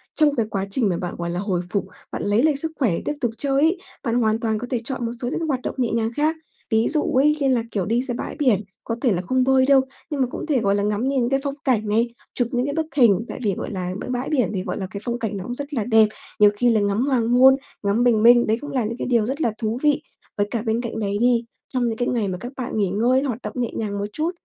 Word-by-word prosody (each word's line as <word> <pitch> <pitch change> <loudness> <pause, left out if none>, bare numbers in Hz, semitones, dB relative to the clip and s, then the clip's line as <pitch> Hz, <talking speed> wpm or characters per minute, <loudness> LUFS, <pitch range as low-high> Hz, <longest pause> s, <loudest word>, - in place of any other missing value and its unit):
Trong 300 -2 +3
cái 230 - +1
quá 195 -2 -2
trình 220 -1 +1
mà 175 - 0
bạn, 175 0 -4
gọi 170 0 -3
là, 175 +1 -2
hồi 190 -3 -1
phục, 200 +1 -1 0.3
bạn - - -4
lấy 205 +4 +2
lại 310 -2 +3
sức 320 +3 -3
khỏe 250 -8 +3
tiếp - - 0
tục 240 -3 +1
chơi 275 +2 +1
ấy, 330 +5 +3 0.3
bạn 235 -3 0
hoàn 220 -2 +2
toàn 220 -2 0
có 245 - -5
thể 245 -3 -1
chọn 250 -1 -3
một 230 - -2
số 245 - -2
những 260 - -2
cái 330 - -2
hoạt 265 -4 -1
động - - -4
nhẹ 245 -3 +1
nhàng 225 0 0
khác. 310 +2 +1 0.3
Ví 220 +1 +2
dụ 305 -1 +2
ấy 295 +3 +3
như 275 - +1
là, 250 -3 +2
kiểu, 195 -4 -1
đi 230 +5 +1
ra 255 -1 -4
bãi - - -5
biển, 245 -9 +3 0.2
có 230 - -3
thể 250 - +3
là 180 -2 0
không 255 +7 +1
bơi 260 0 +4
đâu, 275 -1 +6 0.3
nhưng 295 -3 -2
mà 255 - +2
cũng - - -6
thể, 295 -5 +1
gọi 200 -2 +2
là, 200 - 0
ngắm 210 +3 0
nhìn 265 -3 +1
cái 270 0 +2
phong 280 -1 -2
cảnh 235 -7 +1
này, 230 +3 +1 0.2
chụp 245 - +1
những 245 -1 0
cái 285 - -2
bức 320 -1 0
hình, 230 -5 +4
tại - - -7
vì, 205 -3 +1
gọi - - -5
là, 185 -3 -3
b - - -6
bãi 250 +1 -2
biển 260 -9 +1
thì, 185 - -2
gọi 180 -2 -4
là, 190 - -4
cái 200 - -6
phong 240 0 -2
cảnh 220 -3 -3
nó 190 - -5
cũng 245 +5 -5
rất 285 +2 -6
là 235 -6 0
đẹp, 220 -1 +5 0.3
nhiều 210 -1 +7
khi 245 +2 +3
là 220 -2 +3
ngắm 205 +2 +1
hoàng 255 -5 +1
hôn, 260 +2 +7 0.3
ngắm 205 +4 +2
bình 230 -3 +3
minh, 240 +1 +7
đấy 220 +1 +2
cũng 290 - -6
là 255 -3 0
những 230 +2 -4
cái - - -3
điều 235 -4 +2
rất 270 +6 -3
là 235 - +2
thú 220 +1 -2
vị. 295 0 +3 0.4
Với 205 0 +1
cả 230 - -1
bên 225 +1 0
cạnh 230 -2 -4
đấy 200 -1 -1
đi, 240 0 +3 0.2
trong 255 -2 0
những 225 -1 -2
cái 245 - 0
ngày 230 -5 0
mà 185 -1 -3
các 240 +7 -7
bạn 255 -2 -4
nghỉ 200 -3 +1
ngơi, 240 +7 +2
hoạt 250 -5 -2
động - - -5
nhẹ 245 -3 -1
nhàng 205 -2 -2
một 200 - -1
chút 315 +6 -1
235 Hz, 305 wpm, -22 LUFS, 215-265 Hz, 0.4 s, nhiều